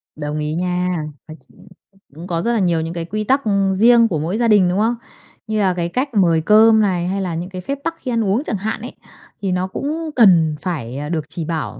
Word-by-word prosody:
Đồng 150 0 -4
ý 150 0 -2
nha. 180 -1 -1 0.2
Nói 155 0 -10
chung - - -20 0.5
cũng 170 +3 -9
có 170 -2 -2
rất 235 +6 0
là 230 - +1
nhiều 175 -4 +1
những 165 +1 -4
cái 170 -1 -4
quy 215 +4 -3
tắc 270 +6 +2 0.3
riêng 230 +3 +5
của 165 -8 -2
mỗi 170 +8 -2
gia 235 - +1
đình, 205 -5 +4
đúng 185 +3 0
không? 230 +3 +1 0.5
Như 215 -1 -1
là 190 -3 +2
cái 170 -1 -2
cách 255 +9 -1
mời 170 -6 +3
cơm 220 +5 +5
này, 180 -4 0
hay 195 +2 -2
là 180 -3 -3
những 175 +3 -5
cái 185 -1 -7
phép 275 +8 -4
tắc 330 0 -2
khi 255 - -4
ăn 230 -1 +1
uống 205 +8 +1
chẳng 215 - -3
hạn 215 +3 -4
ấy, 245 - -7 0.5
thì 195 -2 -1
nó 180 +1 -1
cũng 310 +10 -4
cần 170 -9 +5
phải 140 -8 -4
được 160 -3 -2
chỉ 165 0 -5
bảo 160 -1 -4
185 Hz, 245 wpm, -19 LUFS, 170-220 Hz, 0.5 s, riêng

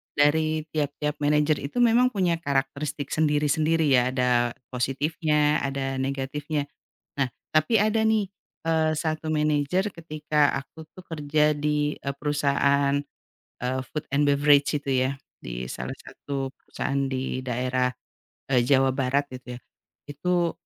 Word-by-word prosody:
dari 155 +2 +2
tiap-tiap 150 0 -2
manajer 150 0 +2
itu 195 +13 -1
memang 240 +2 +5
punya 180 -4 +1
karakteristik 140 0 -2
sendiri-sendiri 155 +1 +2
ya, 125 -2 +4
ada 125 -2 +2 0.2
positifnya, 150 +4 +1
ada 135 -1 -2
negatifnya. 140 +3 -2 0.6
Nah, 135 - +3 0.3
tapi 155 +9 +4
ada 215 +2 +2
nih, 220 -2 +3 0.4
eee, 160 -1 +2
1 155 0 -2
manajer 155 +5 +1
ketika 155 -2 0 0.2
aku 160 - -14
tuh 185 - -14
kerja 150 -1 +1
di, 150 0 0
eee, 140 -1 -3
perusahaan, 140 -1 +2 0.7
eee, 130 +1 -1
food 150 - -2
and 145 +1 +2
beverage 145 +1 +4
itu, 145 -1 -2 0.2
ya, 135 - -2 0.2
di - - -6
salah 65 +1 -5
1 135 -2 -5
perusahaan 140 0 -3
di 130 -1 -3
daerah, 125 +1 0 0.6
eee, 125 - +5
Jawa 135 +2 +3
Barat 135 +1 +1
itu, 125 -1 -8
ya. - - -9 0.5
Itu 170 +4 0
145 Hz, 130 wpm, -25 LUFS, 135-155 Hz, 0.7 s, memang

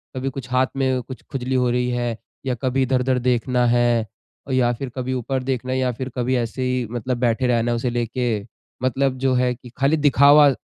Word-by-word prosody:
कभी 130 +1 -2
कुछ 130 -1 -8
हाथ 130 0 +3
में 130 -2 +1
कुछ 130 +2 -10
खुजली 130 -1 -2
हो 125 -1 +2
रही 125 0 0
है 120 -2 -2 0.3
या 125 -2 0
कभी 130 0 +1
इधर-उधर 130 0 +1
देखना 125 0 +1
है 120 -1 +3 0.5
या 125 -2 +3
फिर 130 +2 -5
कभी 130 0 -2
ऊपर 130 +1 -2
देखना 130 -1 -2
है - - 0
या 130 -1 +1
फिर 130 +3 -5
कभी 125 +1 0
ऐसे 120 +1 -2
ही 125 -1 0
मतलब 120 +1 -2
बैठे 125 +1 +1
रहना 120 -1 +1
है - - +1
उसे 120 +1 -1
लेके 120 +1 -1 0.5
मतलब 130 +1 +1
जो 130 0 +1
है 125 0 +2
कि 125 0 -14
खाली 140 +4 +2
दिखावा 145 0 +6
125 Hz, 210 wpm, -22 LUFS, 120-130 Hz, 0.5 s, दिखावा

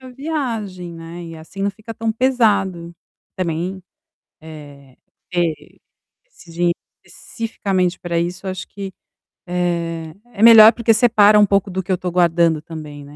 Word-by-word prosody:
a 260 - -12
viagem, 235 - -4
né. 165 +1 -9
E 165 -1 -9
assim 160 +5 -11
não 200 - +1
fica 215 +3 -10
tão 225 0 -2
pesado. 200 -9 0 0.4
Também, 180 +2 -3 0.6
eh, 145 -4 -13 0.4
ter 170 -3 -3 0.5
esse 180 - -17
dinheiro 170 +1 0 0.3
especificamente 190 -5 -3
para 170 -1 -2
isso, 180 +3 -4
acho 185 -1 -5
que, 195 -1 -8 0.5
eh, 170 -2 -2 0.2
é 205 - -2
melhor 225 -1 +10
porque 230 -1 +2
separa 215 -2 +5
um 205 - +6
pouco 200 0 0
do 190 +1 -2
que 180 - -28
eu 185 - +2
tô 180 0 -4
guardando 170 -2 +2
também, 150 -3 -9
né. 145 +1 -14
180 Hz, 150 wpm, -19 LUFS, 170-210 Hz, 0.6 s, melhor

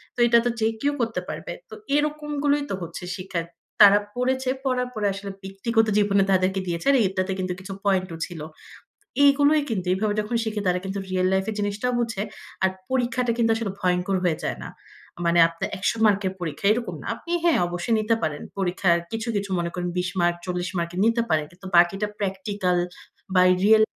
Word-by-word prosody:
তো - - -9
এটা 235 0 +6
তো - - +3
যে 220 - +2
কেউ 285 +1 +1
করতে 225 -1 -1
পারবে। - - -5 0.2
তো - - -11 0.2
এরকম 300 0 -1
গুলোই 290 0 +2
তো - - -1
হচ্ছে 170 +1 -7
শিক্ষা। 185 -3 -3 0.4
তারা 205 0 +9 0.2
পড়েছে, 260 +1 0 0.2
পড়ার 250 -1 +1
পরে 210 -2 0
আসলে 200 0 -6
ব্যক্তিগত 220 +4 0
জীবনে 200 -1 +3
তাদেরকে 190 +1 +2
দিয়েছে। 170 +6 -3
আর 275 - +5
এটাতে 185 0 -2
কিন্তু 185 -1 -1
কিছু 195 +1 -7
পয়েন্ট 190 -2 +2
ও - - -8
ছিল। 175 -2 -9 0.9
এগুলোই 285 +2 +5
কিন্তু, 190 -5 -2
এভাবে 205 +2 0
যখন 215 +3 -3
শিখে 215 -2 -2
তারা 180 0 +2
কিন্তু 195 +1 -3
রিয়াল 185 0 +1
লাইফ 190 0 +1
এ - - -3
জিনিসটাও 205 +5 -1
বুঝে, 225 -4 -1 0.4
আর 190 - +5 0.2
পরীক্ষাটা 250 -1 +1
কিন্তু 230 -1 +3
আসলে 225 -4 -2
ভয়ংকর 180 +1 +1
হয়ে 165 -3 +1
যায় - - -2
না। - - -7 0.6
মানে 170 0 +3
আপনার 165 0 -5
১০০ 205 +4 0
মার্কের 200 -2 +2
পরীক্ষা, 165 +1 -5
এরকম 235 +1 -4
না। - - -8
আপনি 340 - -9
হ্যাঁ, 335 - +4
অবশ্যই 175 +6 -1
নিতে 220 +1 +2
পারেন। 150 -2 -2 0.2
পরীক্ষার 175 -2 +2
কিছু, 225 +1 -3
কিছু 200 -1 -2
মনে 170 0 -1
করেন 180 0 -3
২০ 180 0 0
মার্ক, 175 0 +2
৪০ 180 0 -2
মার্ক 170 0 -2
নিতে 230 +1 +3
পারেন। 155 -1 +2
কিন্তু 185 +2 -12
বাকিটা 185 +4 +4
প্র্যাকটিক্যাল 190 -2 -1 0.6
বা 180 - +7 0.2
রিয়াল 220 +1 +6
200 Hz, 195 wpm, -24 LUFS, 180-230 Hz, 0.9 s, তারা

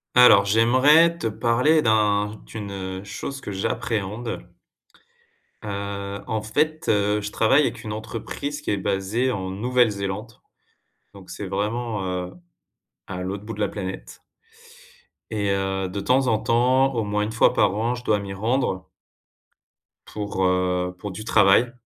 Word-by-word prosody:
Alors 115 -5 +8
j'aimerais 130 +11 +5
te - - -5
parler 125 +8 +2
d'un 105 -1 +2
d'une, 105 -3 -7
heu, 95 -1 -5
chose 135 +7 -6
que 105 - -6
j'appréhende. 110 +1 -3 1.1
Heu, 100 -1 -5
en 110 -1 -1
fait, 150 +9 -1
heu, 105 0 +2
je 105 0 -5
travaille 135 +8 +4
avec - - -3
une 105 - -5
entreprise 130 +7 -5
qui - - -2
est 100 - +1
basée 100 +6 0
en 95 -5 -3
Nouvelle-Zélande, 105 -1 -1 0.7
donc 95 -2 -14
c'est 90 +3 -6
vraiment, 105 +3 -2
heu, 90 -1 -3 0.8
à 90 -1 -5
l'autre 100 +2 -5
bout 115 - -5
de 105 - -6
la 105 - +1
planète. 95 -2 -7 1.1
Et 105 -2 -1
heu, 95 -1 -1
de 100 +2 -4
temps 130 +5 +2
en 110 -3 +3
temps 130 +4 +2
au 115 - 0
moins 105 0 -1
1 105 - -3
fois 110 - +3
par 95 - +3
an 115 +3 0
je 120 - -9
dois 105 -3 +2
m'y 100 -1 -6
rendre 105 -2 -1 1.2
pour, 105 -2 -3
heu, 90 0 +1
pour 100 +2 -6
du 110 +4 -7
travail. 110 +2 +4
105 Hz, 150 wpm, -23 LUFS, 100-120 Hz, 1.2 s, Alors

